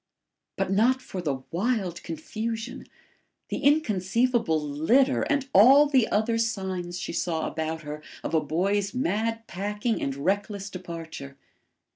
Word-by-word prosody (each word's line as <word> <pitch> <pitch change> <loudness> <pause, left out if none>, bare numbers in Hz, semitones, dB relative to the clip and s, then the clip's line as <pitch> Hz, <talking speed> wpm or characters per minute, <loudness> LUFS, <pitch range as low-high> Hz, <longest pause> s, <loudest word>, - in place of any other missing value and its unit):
But 195 -1 -1
not 235 +7 +3
for 190 -7 -6
the 135 -5 -2
wild 190 -2 -1
confusion 225 - -5 0.6
the - - -2
inconceivable 235 - +2
litter 160 - +2
and 280 -2 0
all 265 +9 +8
the 265 -6 +3
other 225 +2 +1
signs 190 -5 -2
she - - -4
saw 160 -3 -1
about 160 0 -3
her 150 0 -6 0.2
of - - -4
a 160 - +4
boy's 200 +7 0
mad 225 0 -1
packing 210 +5 -2
and 135 -1 -2
reckless 195 +6 -2
departure. 165 -6 -8
195 Hz, 130 wpm, -26 LUFS, 165-230 Hz, 0.6 s, all